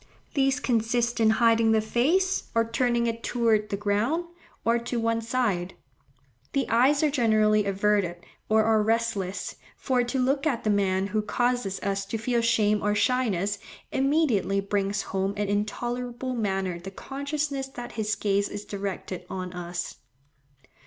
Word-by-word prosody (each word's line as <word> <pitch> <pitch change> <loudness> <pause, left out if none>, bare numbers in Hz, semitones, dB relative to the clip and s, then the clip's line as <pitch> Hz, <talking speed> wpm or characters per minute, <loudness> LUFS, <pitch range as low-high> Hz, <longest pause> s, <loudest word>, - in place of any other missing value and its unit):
These 270 0 +2
consist 240 -1 0
in 220 -1 +5
hiding 230 -1 +4
the 220 - +4
face, 320 - +1
or 230 0 +3
turning 240 0 +1
it 230 0 -2
towards 225 -3 +1
the 200 - -2
ground, 210 - 0 0.4
or 230 +1 +3
to 235 +1 -3
one 230 0 0
side. 220 -7 -1 0.8
The 275 - +1
eyes 265 +6 +4
are 300 - +3
generally 215 -5 +3
averted 200 -2 +1 0.3
or 220 0 +4
are 220 0 +3
restless, 215 -4 -1 0.2
for 255 -2 +1
to 240 +2 -2
look 275 +3 +1
at 255 -6 -1
the 215 - +2
man 195 -2 +1
who 210 +2 0
causes 240 -3 0
us 195 0 -2
to 225 - -2
feel 235 +2 0
shame 215 -3 +2
or 210 0 +1
shyness, 205 -5 +1 0.3
immediately 270 -8 +2
brings 200 0 -1
home 195 +1 -1
in 205 0 -2
an 200 - -3
intolerable 240 +5 -2
manner 195 -6 -1
the 185 +3 -7
consciousness 280 +4 -3
that 245 -2 -8
his 215 -1 -1
gaze 200 -1 0
is 205 - -6
directed 195 -2 -5
on 185 -1 -5
us. 175 0 -5
225 Hz, 155 wpm, -26 LUFS, 200-245 Hz, 0.8 s, in